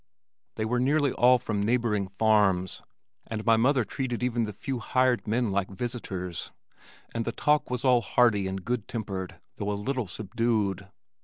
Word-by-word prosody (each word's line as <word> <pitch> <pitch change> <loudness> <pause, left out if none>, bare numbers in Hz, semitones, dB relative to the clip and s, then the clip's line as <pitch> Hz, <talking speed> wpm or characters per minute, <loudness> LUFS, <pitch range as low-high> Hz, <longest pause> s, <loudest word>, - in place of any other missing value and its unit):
They 110 - -2
were 120 +2 0
nearly 140 +2 +2
all 125 +1 +5
from 105 -3 -2
neighboring 110 -3 +1
farms, 100 -3 +2 0.5
and 110 -1 -4
my 115 -1 +6
mother 125 +1 +3
treated 125 -1 -3
even 120 -2 +1
the 105 - -5
few 125 +5 -4
hired 130 0 +1
men 115 0 +1
like 95 -1 0
visitors, 95 -5 -4 0.6
and 115 - -1
the - - -2
talk 150 0 +1
was 125 +1 -2
all 125 -2 +5
hearty 105 -2 +3
and 95 -1 -5
good 120 -3 -2
tempered 100 -6 -5 0.2
though 105 0 -2
a 100 - -2
little 125 +1 -2
subdued. 105 -1 -1
115 Hz, 165 wpm, -27 LUFS, 100-125 Hz, 0.6 s, my